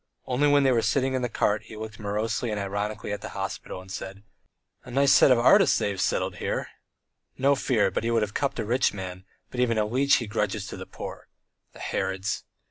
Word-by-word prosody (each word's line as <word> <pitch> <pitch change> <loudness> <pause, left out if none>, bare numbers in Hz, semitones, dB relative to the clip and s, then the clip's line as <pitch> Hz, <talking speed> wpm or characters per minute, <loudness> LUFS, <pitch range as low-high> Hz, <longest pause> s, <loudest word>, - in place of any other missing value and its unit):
Only 130 +4 +2
when 145 -1 +5
they 135 - +4
were 120 -2 +3
sitting 130 +4 +1
in 130 - 0
the 125 - -1
cart 105 -1 +1
he 110 -1 -10
looked 110 -1 -7
morosely 110 +3 -2
and 105 -1 -2
ironically 100 +2 -3
at 105 - -3
the - - -6
hospital, - - -5
and 95 0 -13
said: 95 +1 -7 0.6
"A - - -12
nice 135 +2 +3
set - - +7
of 130 - +6
artists 170 - +5
they - - 0
have 95 -2 -3
settled - - 0
here! - - -2 0.7
No 140 +2 +4
fear, 115 -7 +1
but - - -2
he 115 - 0
would 115 -2 +2
have 105 -1 -4
cupped 140 -1 -1
a 115 - -2
rich 120 0 +1
man, 95 -1 -7 0.3
but 125 - -5
even 120 -2 +2
a 105 - +2
leech 130 +6 +3
he 120 - -1
grudges 105 -1 -2
to - - -6
the - - -8
poor. - - -8 0.5
The - - -14
Herods!" 95 +1 -2
110 Hz, 225 wpm, -26 LUFS, 105-130 Hz, 0.7 s, set